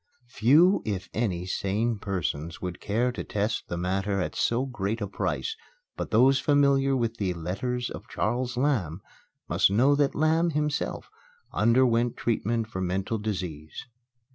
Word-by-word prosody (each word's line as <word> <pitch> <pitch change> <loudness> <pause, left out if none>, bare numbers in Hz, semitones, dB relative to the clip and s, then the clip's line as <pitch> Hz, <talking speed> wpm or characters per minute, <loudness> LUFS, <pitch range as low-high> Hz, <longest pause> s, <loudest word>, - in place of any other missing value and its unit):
Few, 150 - +4
if 100 -3 -4
any, 95 -6 -1
sane 105 +4 -1
persons 85 -5 -3
would 90 -1 -5
care 120 +5 0
to 125 - -5
test 105 +2 -2
the 85 - -4
matter 95 +3 -1
at 90 - -3
so 120 +3 +1
great 110 -4 -3
a 105 - -2
price; 440 - -2 0.4
but - - -4
those 130 +5 +5
familiar 140 -1 +3
with 115 -2 -1
the 95 -4 -1
"Letters 120 +9 -3
of - - -8
Charles 125 0 -2
Lamb" 110 - 0 0.5
must - - +3
know 125 +8 +4
that 145 -1 +1
Lamb, 160 +2 +2
himself, 150 0 -2 0.4
underwent 120 +1 +3
treatment 115 0 0
for 110 -4 -6
mental 95 +4 -1
disease. 90 -8 -5
115 Hz, 145 wpm, -27 LUFS, 95-130 Hz, 0.5 s, those